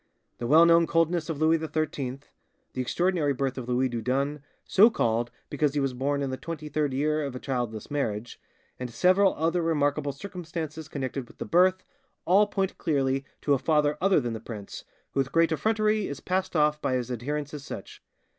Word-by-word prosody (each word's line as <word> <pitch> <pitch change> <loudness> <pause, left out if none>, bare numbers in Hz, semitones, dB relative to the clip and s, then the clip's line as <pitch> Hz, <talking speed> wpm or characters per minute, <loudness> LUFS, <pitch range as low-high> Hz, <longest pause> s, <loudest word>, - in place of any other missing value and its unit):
The 120 - -3
well 160 +5 +7
known 170 0 +5
coldness 165 0 +1
of 155 -3 -3
Louis 160 +1 +3
XIII; 150 -4 -3 0.5
the 130 - -2
extraordinary 170 +1 +1
birth 135 0 -2
of 125 -2 -6
Louis 125 +1 +2
Dieudonne, 130 +5 -1 0.2
so 210 +4 +6
called 120 - 0 0.2
because 150 -2 0
he - - +2
was 135 -2 0
born 140 +3 -1
in 135 - -2
the 130 - -3
twenty 155 -1 -6
third 150 -1 0
year 150 +3 0
of 140 -3 -4
a - - -5
childless 120 -3 -3
marriage, 115 -6 -3 0.4
and 125 -1 -4
several 185 - +3
other 165 +3 +1
remarkable 145 -3 +1
circumstances 160 -1 -6
connected 135 -3 -4
with - - -18
the - - -5
birth, 185 +2 +3 0.4
all 200 +4 +5
point 195 -2 -2
clearly 135 -4 0 0.2
to 145 - +2
a 135 - +2
father 150 0 +2
other 195 -1 +4
than 120 -4 -3
the 110 - -5
prince, 105 -3 -8 0.3
who - - -2
with 135 0 0
great 165 +1 +3
effrontery 215 +5 +1
is 140 - -5
passed 185 0 -2
off 150 -1 +2
by 130 - 0
his 125 0 -2
adherents 145 +5 -3
as 145 -2 -6
such. - - -9
145 Hz, 195 wpm, -27 LUFS, 130-165 Hz, 0.5 s, well